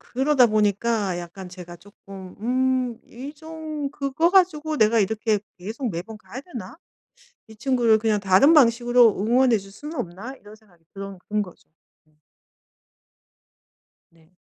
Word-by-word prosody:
그러다 265 -1 +4
보니까 210 -2 +1
약간 180 +2 -9
제가 175 -1 -10
쪼끔 195 0 -13
음 255 +4 0 0.4
이 270 +5 -9
좀 315 -2 -6
'그거 290 +4 0
가지고 315 -5 +2
내가 220 +1 +4
이렇게 215 +1 0 0.2
계속 220 +7 -4
매번 195 +6 -6
가야 240 +4 -10
되나? 250 - -9 0.7
이 220 - -14
친구를 235 -2 +2
그냥 215 -1 0
다른 195 - +5
방식으로 240 -5 +4
응원해 240 +2 +3
줄 195 0 -11
수는 300 +9 -8
없나?' 220 +5 -6
이런 210 -3 -15
생각이 185 -7 -26
들은 195 -1 -8
든 210 0 +1
거죠. 180 -4 -10 0.4
음. 155 - -33 2.0
네. 165 +2 -27
220 Hz, 270 characters per minute, -23 LUFS, 195-265 Hz, 2.0 s, 다른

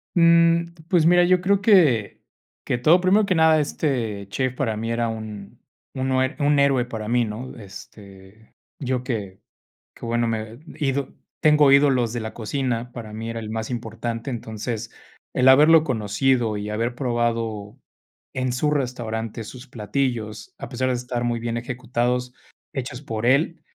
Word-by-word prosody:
Mm, 170 0 +4
pues, 170 -3 +3
mira, 175 +1 +6
yo 180 0 +3
creo 200 +1 +2
que 155 - +4 0.5
que - - 0
todo 155 +9 +5
Primero 195 +4 +3
que 190 - +1
nada, 160 -1 +5
este 115 -10 -2
chef 130 +5 -2
para 115 -5 -1
mí 115 +2 -3
era 115 0 0
un 110 -3 -7 0.3
uno 130 0 0
eh 130 +3 -1
un 145 0 +3
héroe 135 -3 +3
para 110 -3 -6
mí, 120 +1 +2
¿no? 110 +4 -7
Este, 100 0 -14 0.3
yo 130 -2 -2
que 105 -7 -4 0.5
que - - -10
bueno, 120 0 0
me 110 -1 -3 0.2
he 150 - -2
ido 135 0 -1 0.3
tengo 150 -3 +5
ídolos 135 -5 +4
de 120 - -2
la 110 - -6
cocina, 120 +1 -3
para 110 -3 -8
mí 110 +1 -5
era 115 0 -4
el 110 -1 -7
más 110 +1 -4
importante. 115 0 -4
Entonces, 115 -1 -5 0.4
el 130 +1 +2
haberlo 155 +4 +7
conocido 115 -1 0
y 105 +1 -5
haber 115 +3 -2
probado 115 -3 -2 0.6
en 130 -1 -1
su 150 +4 0
restaurante 115 -5 -3
sus 125 +4 -11
platillos, 115 -2 -3
a - - -8
pesar 130 0 -1
de 130 - +1
estar 120 0 -3
muy 120 -1 -1
bien 115 0 -2
ejecutados, 125 0 -2 0.4
hechos 125 -2 -5
por 115 -5 -4
él, 150 +5 +2
120 Hz, 165 wpm, -23 LUFS, 110-140 Hz, 0.6 s, haberlo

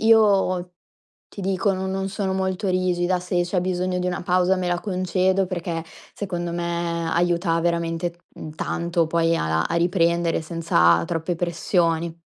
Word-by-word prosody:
io, 195 -5 +3 0.6
ti 200 - -8
dico 195 +1 +1
no 190 0 -3
non 190 0 -2
sono 195 -1 -2
molto 190 +1 -1
rigida, 180 0 +1
se 180 0 0
c'è 175 +1 -1
bisogno 180 0 -1
di 180 - -1
una 180 -1 -2
pausa 180 +1 +2
me 185 - -2
la 175 0 0
concedo 185 0 +1
perché 170 -2 -4 0.3
secondo 175 -4 -4
me 170 -1 -2
aiuta 170 0 +1
veramente, 170 0 -1 0.2
mhmm, 155 - -7
tanto 170 +1 -1
poi 165 0 +2
a 80 0 0
a - - +1
a - - -2
riprendere 170 -1 +2
senza 85 - +3
troppe 165 - -2
pressioni. 170 -1 0
175 Hz, 155 wpm, -23 LUFS, 170-185 Hz, 0.6 s, io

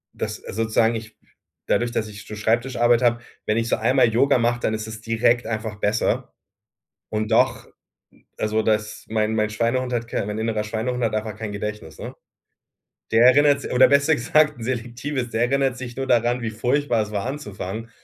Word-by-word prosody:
Dass - - -4
sozusagen 110 +1 0
ich 110 -1 -8 0.5
dadurch, 120 0 +1
dass 110 -2 -2
ich 105 0 -11
so 105 - -7
Schreibtischarbeit 120 +2 +2
habe, 120 -1 +2 0.2
wenn 105 - +1
ich 115 0 -1
so - - +2
einmal 125 +2 +3
Yoga 135 +5 +3
mache, 120 +1 +1
dann 110 - -1
ist 110 0 -4
es 110 0 -8
direkt 115 +2 +1
einfach 110 -2 -4
besser. 105 +2 0 0.8
Und 110 0 -2
doch - - +2 0.7
also 110 +1 0
das 105 -1 -1
mein 110 0 0
mein 105 -1 +1
Schweinehund 120 +4 -1
hat 115 -1 -2
kei 115 - -2
mein 105 +1 -4
innerer 110 -1 -1
Schweinehund 115 +3 -2
hat 110 -2 0
einfach 110 -1 -3
kein 110 -1 -5
Gedächtnis, 105 -6 -6
ne? - - -7 1.0
Der 115 +2 +5
erinnert 140 +2 +5
s - - -5
oder 125 +1 +6
besser 140 +3 +4
gesagt, 150 +1 +2
selektives. 125 +2 -3
Der 115 +1 +1
erinnert 135 -1 +1
sich 120 -1 -7
nur 135 0 -3
daran, 120 0 +2
wie 115 -2 -3
furchtbar 125 +2 +1
es 105 - -9
war, 100 -2 -2
anzufangen 115 -5 -5
115 Hz, 185 wpm, -23 LUFS, 110-125 Hz, 1.0 s, oder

